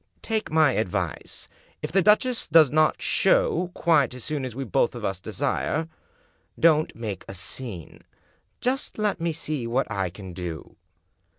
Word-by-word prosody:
Take 220 -1 -1
my 155 -2 +4
advice. 105 -7 -3 0.4
If - - -3
the 195 +3 +4
duchess 225 +5 +3
does 155 -3 +6
not 155 0 +2
show - - +2
quite 150 -6 +3
as 125 - -8
soon 150 -3 -3
as 125 -3 -6
we 135 - -3
both 110 - +1
of - - -5
us 95 -2 -2
desire, 160 - -1 0.7
don't 155 -2 +4
make 110 -4 -5
a 95 - -7
scene; 95 -1 -7 0.6
just 260 +2 -1
let 210 -4 0
me 170 0 +1
see 150 -5 -4
what 125 +4 +1
I 95 -2 -1
can 95 0 -10
do." 85 -2 -7
150 Hz, 160 wpm, -25 LUFS, 105-170 Hz, 0.7 s, does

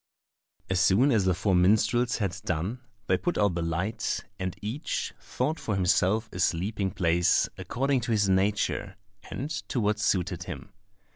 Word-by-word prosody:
As 95 -1 0
soon 100 +9 +4
as 105 -6 +3
the 95 -2 +2
four 95 +1 0
minstrels 110 +7 +3
had 100 -5 -1
done, 95 +6 -2 0.3
they 95 - +2
put 175 - -1
out 100 -3 +2
the 85 - -2
light, 90 +7 -2 0.2
and 95 -1 -3
each 115 +9 -3
sought 150 +5 -2
for 105 - -2
himself 95 +4 +2
a 90 - -6
sleeping 95 +3 0
place 85 -1 +2
according 135 0 -1
to 115 - -3
his 105 -3 +2
nature 100 0 0 0.3
and 145 +5 -5 0.2
to 125 - -1
what 105 -1 +1
suited 90 -4 0
him. 90 +3 -8
100 Hz, 160 wpm, -27 LUFS, 90-110 Hz, 0.3 s, soon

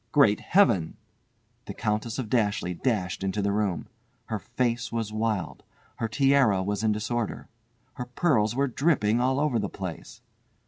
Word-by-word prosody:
"Great 115 -8 +5
Heaven!" 130 - +2 0.7
The - - -7
Countess 110 +2 -2
of 130 -4 -3
Dashleigh 105 -6 0
dashed 95 -7 -1
into 95 +2 -1
the 100 0 +1
room. 100 -4 -1 0.4
Her 110 -2 -3
face 120 +2 -2
was 115 -2 -3
wild. 110 -4 -2 0.4
Her 115 - -1
tiara 125 -4 +3
was 100 +2 -2
in 110 - +3
disorder. 110 +2 -2 0.5
Her 125 - -5
pearls 125 -5 +1
were 140 +2 +2
dripping 125 -5 +2
all 130 +2 +1
over 145 -6 +1
the 100 -2 -2
place. 90 -4 -7
110 Hz, 150 wpm, -27 LUFS, 105-125 Hz, 0.7 s, Great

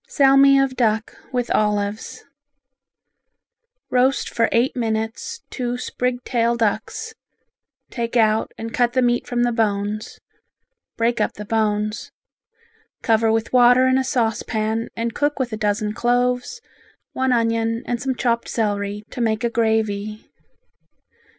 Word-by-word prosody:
Salmi 275 -1 +5
of 270 -1 +1
Duck 220 -3 0 0.2
with 245 -2 -2
Olives 210 0 -1 1.7
Roast 255 +2 +2
for 230 -1 +2
eight 235 +3 +2
minutes 225 - -3
two 245 -1 -3
sprig 250 0 -3
tail 235 -1 +1
ducks, 235 - -2 0.8
take 235 0 -2
out 220 -1 +2
and 225 0 -6
cut 240 -1 +1
the 255 -1 +2
meat 240 0 +1
from 240 -1 0
the 240 - +2
bones. 210 -2 -2 0.8
Break 230 0 +1
up - - 0
the 210 - -8
bones. 215 0 -1 0.9
Cover 225 -1 +3
with 225 +2 -1
water 250 +1 +6
in 260 0 +3
a - - 0
saucepan 225 -3 -1
and 230 0 -2
cook 290 0 0
with 250 -4 -2
a - - 0
dozen 210 0 -1
cloves, 245 - 0 0.5
one 260 0 0
onion 230 -1 0
and 240 -1 -2
some 260 0 -1
chopped 235 -2 -1
celery, 205 -2 -2
to 245 - -5
make 220 0 0
a 235 - 0
gravy. 215 -2 -1
230 Hz, 135 wpm, -21 LUFS, 220-250 Hz, 1.7 s, water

